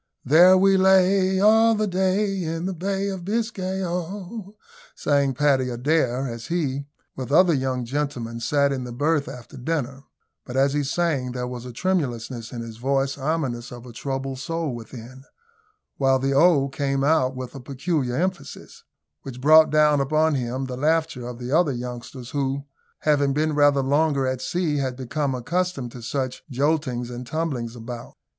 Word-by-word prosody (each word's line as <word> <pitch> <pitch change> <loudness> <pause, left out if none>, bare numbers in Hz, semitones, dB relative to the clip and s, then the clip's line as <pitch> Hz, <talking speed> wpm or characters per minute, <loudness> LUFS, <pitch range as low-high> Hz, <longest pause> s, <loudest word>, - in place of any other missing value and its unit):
"There 175 +6 +7
we 195 +1 +4
lay 190 0 +4
all 220 +2 +5
the 215 0 0
day, 190 +1 0
in 165 0 -3
the 190 - -2
Bay 195 +3 -2
of 190 -3 -5
Biscay, 195 -2 -2
oh!" 185 +4 -5 0.4
sang 140 -2 +1
Paddy 135 -2 +2
Adair, 130 0 0
as 115 -2 -7
he, 140 -5 -2 0.3
with 130 -1 -6
other 175 +3 +5
young 130 -3 -1
gentlemen, 125 -3 -3
sat 140 +4 +2
in 130 -2 -2
the 125 - -7
berth 145 +4 0
after 125 +2 -10
dinner; 135 -1 -3 0.4
but, 125 0 -6
as 135 +1 +3
he 145 - +1
sang, 140 -4 -1
there 125 -1 -3
was 125 0 -6
a - - -7
tremulousness 125 -7 -2
in 120 - -5
his 115 -1 -8
voice 135 +2 0
ominous 135 -5 -2
of 120 0 -10
a 120 - -11
troubled 135 +1 -4
soul 165 -1 -3
within, 120 +2 -10 0.7
while 135 -1 +3
the 135 +1 0
"Oh!" 145 -1 +4
came 135 0 -1
out 140 -3 +2
with 130 -1 -6
a 135 - -8
peculiar 135 0 -2
emphasis 185 +5 -4 0.4
which 130 -2 -8
brought 155 +4 +7
down 150 -2 +4
upon 155 +3 +2
him 130 0 -2
the 125 -1 -6
laughter 155 -4 0
of 125 -1 -7
the 125 +1 -6
other 160 -2 +3
youngsters, 125 +1 -7
who, 140 0 -2 0.4
having 145 -2 +2
been 155 +2 0
rather 145 -2 +4
longer 140 0 +2
at 130 -1 -2
sea, 165 +1 -1
had 130 -2 -1
become 135 +2 -2
accustomed 165 -1 -2
to 120 - -10
such 130 +1 -3
joltings 130 -3 0
and 120 0 -7
tumblings 135 -6 -3
about. 120 0 -8
140 Hz, 170 wpm, -24 LUFS, 125-165 Hz, 0.7 s, There